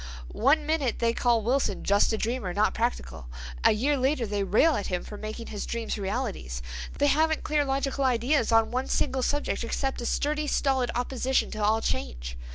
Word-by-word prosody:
One 295 +6 +4
minute 295 -6 0
they 230 0 +1
call 235 -2 +2
Wilson 245 -4 0
'just 200 +3 +3
a 220 - 0
dreamer, 220 -5 -2
not 210 +1 +2
practical'—a 60 - -2
year 265 +8 +1
later 265 -1 +1
they 205 -1 -1
rail 280 +11 +3
at 205 - -3
him 180 -1 -2
for 210 - -9
making 215 +2 -6
his 205 - -4
dreams 230 -1 -3
realities. 195 - -3 0.3
They 285 - +2
haven't 315 +2 +2
clear 300 -1 +1
logical 275 0 -1
ideas 245 +1 +2
on 225 -1 +4
one 255 +2 -1
single 265 -2 0
subject 290 -1 -1
except 265 +3 -2
a 240 - -3
sturdy, 300 +1 0
stolid 265 -4 +1
opposition 255 +1 0
to 215 -1 -3
all 220 +2 +3
change. - - -3
240 Hz, 180 wpm, -27 LUFS, 210-275 Hz, 0.3 s, One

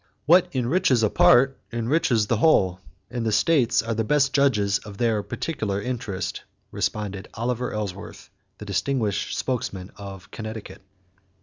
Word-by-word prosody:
"What 175 +4 +6
enriches 130 0 +2
a 110 - +2
part 135 +2 +5
enriches 120 -1 +1
the 115 +2 0
whole 95 - +3 0.3
and 120 -1 -3
the 110 - 0
states 125 -1 +3
are 115 0 -2
the 115 0 0
best 140 +2 +2
judges 105 -8 +2
of 105 -2 -11
their 115 -2 +1
particular 105 -5 -3
interest," 105 -4 -4 0.3
responded 100 -2 -3
Oliver 125 +2 -2
Ellsworth, 100 -2 -6 0.3
the 105 - -9
distinguished 105 +1 -1
spokesman 100 -7 -3
of 95 -2 -10
Connecticut. 110 -1 -7
115 Hz, 135 wpm, -24 LUFS, 100-130 Hz, 0.3 s, What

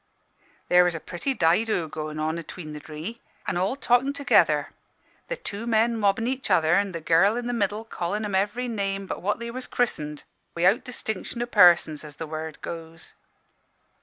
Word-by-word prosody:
"There 180 0 +6
was 175 -1 +1
a - - -3
pretty 185 - -3
dido 175 0 +2
goin' 155 0 -5
on 155 +2 -1
atween 160 -1 -8
the 150 - -6
dree, 160 +10 -7 0.2
an' - - -2
all 185 +8 0
talkin' 260 +1 +2
together 285 0 +3 0.6
the - - -2
two 215 - -6
men 230 +1 +3
mobbin' 210 0 +1
each 260 +2 -2
other, 160 0 +4
an' 200 +1 +2
the 170 - -4
girl 170 +7 +4
i' - - -1
the 245 0 -3
middle 210 -1 -1
callin' 210 +1 -3
em 205 - -4
every 210 +6 0
name 195 -3 -2
but - - -5
what 205 +3 0
they 235 0 -5
was 255 +1 -6
chris'ened, 150 -11 -2 0.3
wi'out 180 +8 +3
distinction 235 -1 -4
o' - - -2
persons, 175 -9 +5
as 150 -1 -9
the 160 - -5
word 155 0 -6
goes. 165 -1 -8
195 Hz, 185 wpm, -25 LUFS, 165-230 Hz, 0.6 s, There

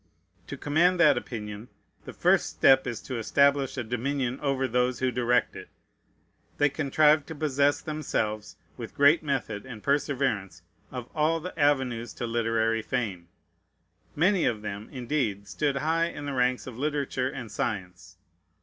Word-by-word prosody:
To - - -6
command 175 +5 +2
that 150 -4 +6
opinion, 105 -2 -6 0.4
the - - -7
first - - +2
step 135 0 +4
is 115 -3 -4
to 130 -3 -4
establish 140 +3 +2
a 130 - -1
dominion 125 +2 -2
over 135 -2 0
those 125 +1 +1
who 130 +2 0
direct 125 0 +1
it. - - -10 0.9
They 145 - +3
contrived 150 +1 +3
to 160 - -7
possess 145 -1 +1
themselves, 110 -9 -3 0.2
with - - -8
great 145 +3 +5
method 130 -8 -3
and 115 -5 -10
perseverance, 125 - -1 0.3
of 125 -2 -6
all 160 +1 +1
the 180 +3 -7
avenues 130 -5 +1
to - - -4
literary 115 -1 0
fame. 105 -8 -3 0.9
Many 180 +4 +3
of 110 -2 -1
them, 105 0 -6
indeed, 120 -6 -2
stood 145 +5 -1
high 160 +4 +1
in 145 -3 -7
the 140 - -3
ranks 125 0 +1
of 125 -2 -9
literature 140 -3 -1
and 120 -5 -7
science. 90 -4 -4
130 Hz, 150 wpm, -27 LUFS, 115-145 Hz, 0.9 s, that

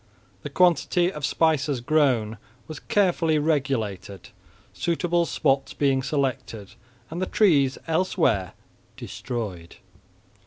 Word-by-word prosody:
The - - -6
quantity 180 0 +2
of 150 - -8
spices 150 -4 +1
grown 120 -6 +1 0.3
was 155 - -8
carefully 175 -5 +1
regulated, 115 - -2 0.4
suitable 170 0 0
spots 135 -2 0
being 135 -2 +1
selected, 130 -7 -3 0.4
and 170 +3 -4
the 185 - -1
trees 145 -11 +3
elsewhere 160 - 0 0.4
destroyed. 100 -9 -6
140 Hz, 95 wpm, -24 LUFS, 120-165 Hz, 0.4 s, trees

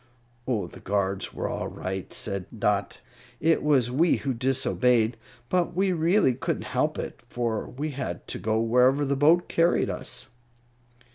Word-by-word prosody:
"Oh, 115 -7 0
the - - -12
guards 100 -1 -1
were - - -3
all - - -3
right," 95 0 -5
said 100 -3 -2
Dot. 100 -1 0 0.4
"It 165 +1 +3
was 135 -5 +2
we 160 +6 +3
who 135 -2 -2
disobeyed. 125 -2 +2 0.3
But 175 +1 0
we 190 +1 +2
really 170 -3 +3
couldn't 125 - -3
help - - +1
it, - - -6
for 115 -3 -2
we 150 +5 -4
had 140 0 -5
to - - -3
go 110 0 0
wherever 125 +5 +3
the 140 0 0
boat 160 +6 +4
carried 170 +1 +2
us." 130 0 -5
130 Hz, 155 wpm, -26 LUFS, 110-150 Hz, 0.4 s, boat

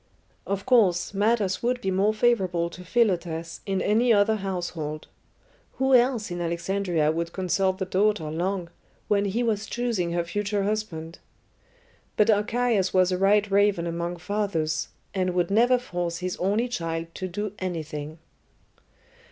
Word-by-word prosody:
Of 200 0 -2
course, 195 -9 +3
matters 205 -1 +1
would 250 +1 0
be 190 -5 -2
more 195 +3 +2
favourable 190 -7 +1
to 180 - -10
Philotas 175 -6 0
in 195 -1 0
any 230 +4 +3
other 215 +1 +4
household. 175 -6 -4 0.7
Who 265 0 +1
else 240 -5 +3
in 175 0 -3
Alexandria 170 -1 0
would 170 +1 -3
consult 190 0 0
the 190 - -2
daughter 190 -4 +1
long, 175 +1 -2 0.4
when 205 -1 +2
he 215 +5 0
was 215 -2 -1
choosing 225 -8 -1
her 170 0 0
future 205 +3 -2
husband? 185 -6 -3 1.0
But 210 +1 +5
Archias 210 -2 +1
was 185 0 +4
a 180 - +1
white 205 +1 +3
raven 200 -3 +3
among 170 +1 -3
fathers, 170 -4 -1 0.3
and 185 -2 -1
would 175 +1 +1
never 240 +4 +4
force 175 -8 -3
his 180 0 -3
only 205 +6 +1
child 165 -7 -4
to 185 - -4
do 205 +3 -4
anything. 155 -4 -5
190 Hz, 145 wpm, -26 LUFS, 170-210 Hz, 1.0 s, But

